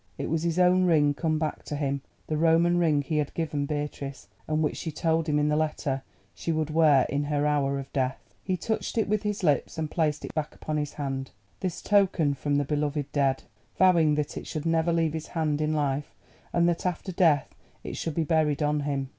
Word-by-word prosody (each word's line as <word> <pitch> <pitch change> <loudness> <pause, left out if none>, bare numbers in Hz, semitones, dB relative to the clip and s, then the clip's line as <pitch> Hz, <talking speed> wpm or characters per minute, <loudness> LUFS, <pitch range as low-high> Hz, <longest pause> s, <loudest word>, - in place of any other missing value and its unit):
It - - -3
was 165 -1 +1
his 170 0 -1
own 185 0 +4
ring 150 -4 +4
come 155 +1 0
back 155 -1 -2
to 150 - -4
him—the 140 +1 -4
Roman 165 +2 +3
ring 155 -4 +2
he 155 +2 -2
had 150 -2 -1
given 150 -3 -1
Beatrice, 145 -2 -5 0.2
and 155 0 +1
which 150 - -1
she 160 - -4
told 160 +1 0
him 150 - +2
in 150 0 +2
the 150 - +2
letter 150 -3 -1 0.3
she 165 - -3
would 155 -1 -1
wear 150 -4 +5
in 145 +1 -1
her 145 0 0
hour 140 -2 +1
of 135 -1 -7
death. 130 -1 -2
He 185 -2 -1
touched 220 +4 -3
it 220 - +2
with 210 0 +1
his 210 -2 -3
lips 150 -1 +1
and 155 -1 -3
placed 155 -3 0
it - - -8
back 155 -2 -3
upon 155 0 -3
his 150 -1 -2
hand, 135 -2 -4 0.3
this 185 -3 -4
token 190 -7 +3
from 145 +1 -1
the 145 0 +1
beloved 145 0 -1
dead, 135 -2 +1 0.3
vowing 170 -5 +5
that 150 -1 -2
it - - -6
should 155 0 -4
never 165 +1 +2
leave 165 -2 +1
his 160 -1 -5
hand 155 -3 -1
in 155 0 +1
life, 145 -1 -1 0.4
and 170 0 +3
that 170 -1 0
after 180 +1 -2
death 165 -6 +2 0.3
it - - -5
should 165 -3 -3
be 165 - +1
buried 155 -2 +1
on 150 0 +1
him. 140 -2 -2
155 Hz, 220 wpm, -27 LUFS, 145-165 Hz, 0.4 s, wear